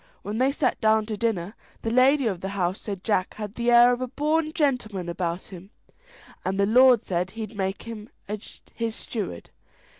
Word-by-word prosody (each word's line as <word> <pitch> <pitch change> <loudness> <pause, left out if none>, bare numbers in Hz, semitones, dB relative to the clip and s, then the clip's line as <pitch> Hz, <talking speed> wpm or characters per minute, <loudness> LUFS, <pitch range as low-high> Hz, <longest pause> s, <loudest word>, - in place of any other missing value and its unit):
When 210 +3 -3
they 265 +2 +3
sat 270 -3 0
down 220 0 +3
to 215 0 -4
dinner, 205 -4 -1 0.3
the 225 - -1
lady 265 +3 +4
of 190 -6 -1
the 195 - -3
house 180 +1 -1
said 200 -3 -5
Jack 195 -4 0
had 210 -2 -6
the 235 +1 -1
air 240 +1 +7
of 245 - -3
a 255 - -1
born 305 +4 0
gentleman 245 - -1
about 170 0 -3
him, 190 0 -12 0.7
and 190 +2 -2
the 200 - +4
lord 245 +1 +6
said 180 0 -1
he'd 220 +1 -7
make 195 -1 -2
him 225 -2 -8 0.2
his 220 +2 -6
steward. 195 - -5
215 Hz, 185 wpm, -25 LUFS, 190-245 Hz, 0.7 s, air